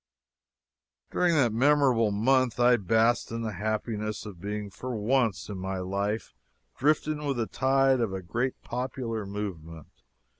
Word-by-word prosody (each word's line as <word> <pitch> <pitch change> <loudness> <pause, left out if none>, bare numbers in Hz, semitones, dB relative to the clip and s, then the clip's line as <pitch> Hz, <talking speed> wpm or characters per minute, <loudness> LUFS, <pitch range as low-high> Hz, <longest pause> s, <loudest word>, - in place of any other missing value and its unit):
During 175 -2 +2
that 120 -7 +3
memorable 130 -3 +4
month 125 +4 +2
I 120 0 +6
basked 115 +4 +2
in 115 0 -4
the 110 - -2
happiness 110 +1 -3
of 95 -5 -9
being 105 0 -4
for 125 +5 -5
once 115 -2 +1
in 100 -3 -6
my 95 +1 -3
life 100 +4 -2 0.4
drifting 150 +1 +1
with 140 -3 -1
the 115 - 0
tide 135 +1 +2
of 115 -4 0
a 95 -1 -5
great 120 +9 -2
popular 120 -4 -4
movement. 85 -10 -7
115 Hz, 145 wpm, -28 LUFS, 100-130 Hz, 0.4 s, I